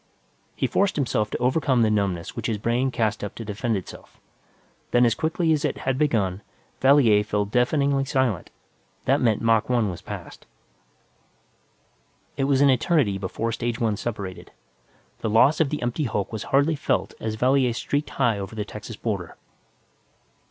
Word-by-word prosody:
He - - -1
forced 200 0 +1
himself 120 -7 0
to - - -3
overcome 130 -1 +2
the 110 - +2
numbness 100 -5 -1
which 115 -1 -3
his 110 -3 -1
brain 120 +5 0
cast 110 -4 -1
up 105 - -5
to 115 - -7
defend 105 +2 -1
itself. 95 - -11 0.7
Then, 120 0 +4
as 115 - +3
quickly 160 +5 0
as 150 - 0
it - - -1
had 130 0 -2
begun, 105 -10 +1 0.4
Valier 130 -7 +5
fell 105 -1 -1
deafeningly 135 +5 +1
silent; 130 - 0 0.6
that - - +2
meant 115 -2 +1
Mach 115 0 +2
1 120 -5 +1
was 85 - -8
passed. - - -9 1.9
It 135 - 0
was 135 -1 +2
an 140 -1 +6
eternity 130 - +1
before 105 +4 -3
stage 120 +1 -3
one 110 -4 +1
separated. 100 -4 -6 0.7
The - - -2
loss 130 +8 +4
of 160 -4 +2
the 150 -3 -3
empty 120 +5 -1
hulk 105 -3 -2
was 110 - -4
hardly 145 +4 +2
felt 145 - -1
as 110 -1 -3
Valier 130 +2 +2
streaked 145 +5 -2
high 120 -6 +1
over 100 +3 -6
the 105 -2 -3
Texas 105 +2 -8
border. 100 -7 -4
115 Hz, 165 wpm, -24 LUFS, 105-135 Hz, 1.9 s, an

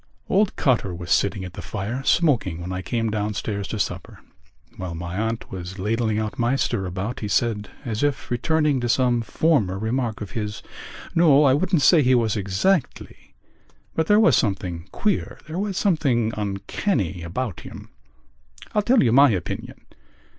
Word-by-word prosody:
Old 200 +1 +2
Cotter 110 - +1
was 85 0 -7
sitting 95 -1 +1
at 90 - -9
the - - -7
fire, 110 +5 -4
smoking, 125 - +2
when 90 +1 -6
I 90 - -3
came 115 +2 -2
downstairs 105 -1 -2
to 110 - -4
supper. 105 - -4 0.6
While 90 -2 -5
my 85 +2 -5
aunt 110 +2 -3
was 95 0 -7
ladling 110 +2 0
out 110 +1 -3
my 120 +3 +2
stirabout 100 -2 -2
he 105 - -4
said, 105 0 0 0.2
as 110 -2 -3
if 145 -3 -1
returning 150 +3 +1
to 120 -1 -2
some 120 -1 +2
former 115 - +1
remark 110 +1 -2
of 105 -4 -7
his: 105 -1 -4 0.5
"No, 155 -4 +5
I 135 -2 +5
wouldn't 170 +1 +1
say 165 +3 +6
he 130 -1 +4
was 115 -3 +1
exactly... 105 - -1 0.6
but 160 0 0
there 210 +1 +5
was 170 - +5
something 90 -4 -1
queer... 210 -3 -1
there 155 +4 -5
was 200 -2 -2
something 135 - +1
uncanny 100 - -2
about 95 +5 -4
him. - - -11 0.8
I'll 210 - +3
tell 240 - +4
you 120 - +3
my 140 +3 +7
opinion...." 95 -7 -4
115 Hz, 165 wpm, -23 LUFS, 100-140 Hz, 0.8 s, my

